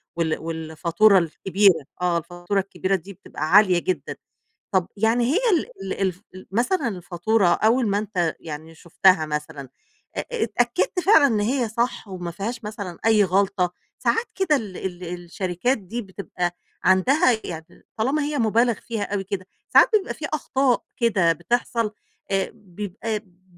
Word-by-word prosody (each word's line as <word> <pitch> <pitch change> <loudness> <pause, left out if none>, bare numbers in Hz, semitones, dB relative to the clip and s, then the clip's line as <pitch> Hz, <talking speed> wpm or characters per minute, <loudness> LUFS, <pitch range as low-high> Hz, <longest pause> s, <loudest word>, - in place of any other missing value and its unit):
وال 165 -2 0
والفاتورة 165 +5 +2
الكبيرة 175 -1 +2 0.2
آه. 175 -1 +2
الفاتورة 175 +4 -2
الكبيرة 195 0 -1
دي 190 +3 -7
بتبقى 155 -2 -6
عالية 190 -3 +6
جدًا. 185 +1 -3 0.6
طَب 185 -2 +2
يعني 225 +3 +2
هي 385 - +3
ال 335 - +2 0.3
ال - - -6
الف 185 0 -1
ال 185 - -11
مثلًا 250 - +1
الفاتورة 180 +2 0
أول 225 +7 +3
ما 200 +1 +1
أنت 185 -6 -1
يعني 160 +1 -8
شُفتها 170 0 +3
مثلًا، 150 -2 -5 0.5
آآ، - - 0
آآ 475 - -2
اتأكّدت 240 - 0
فعلًا 345 -7 +6
إن 220 -5 +1
هي 240 +2 0
صح 235 0 -2
وما 180 -2 -5
فيهاش 225 +7 -5
مثلًا 200 -5 -6
أي 215 -2 +5
غلطة؟ 190 -1 +1 0.3
ساعات 460 +2 +1
كده 345 -6 +2
ال 205 -7 -5
ال 180 -1 -5
الشركات 180 +7 -2
دي 220 +5 -5
بتبقى 180 -3 -4 0.3
عندها 220 - +4
يعني 160 -1 -9
طالما 270 +7 +1
هي 290 0 -2
مُبالغ 230 +1 +3
فيها 225 +1 -5
أوي 195 -1 -1
كده، 190 -1 -4 0.2
ساعات - - +7
بيبقى 395 - -2
في 310 - -9
أخطاء 270 -4 +1
كده 190 -8 +3
بتحصل 230 +5 -1 0.4
آآ 195 -1 0
بيبقى 210 +1 -5
م 185 -3 -30
195 Hz, 155 wpm, -23 LUFS, 175-230 Hz, 0.6 s, ساعات